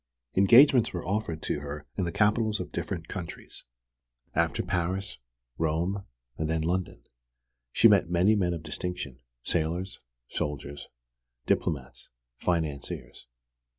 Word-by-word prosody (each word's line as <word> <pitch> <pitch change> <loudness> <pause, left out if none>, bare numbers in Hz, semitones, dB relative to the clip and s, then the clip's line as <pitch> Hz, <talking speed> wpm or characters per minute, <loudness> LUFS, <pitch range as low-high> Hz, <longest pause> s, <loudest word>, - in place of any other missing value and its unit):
Engagements 120 +4 +7
were 90 - -4
offered 95 -5 -2
to - - -1
her 75 0 -6
in 95 - 0
the 85 - -2
capitals 105 +2 +2
of - - -5
different 85 -4 -4
countries: 90 -4 -7 0.7
after - - +1
Paris, 95 -1 -1 0.4
Rome, 85 +5 0 0.3
and 80 0 -1
then 80 -1 +1
London. 85 -7 -2 0.7
She 115 - +7
met 100 -6 +4
many 90 +5 +4
men 90 -4 +1
of 80 - -7
distinction, 75 -4 -4 0.2
sailors, 85 +3 -1 0.3
soldiers, 70 0 -4 0.6
diplomats, 65 -5 -1 0.3
financiers. 80 -7 -2
85 Hz, 120 wpm, -28 LUFS, 80-100 Hz, 0.7 s, Engagements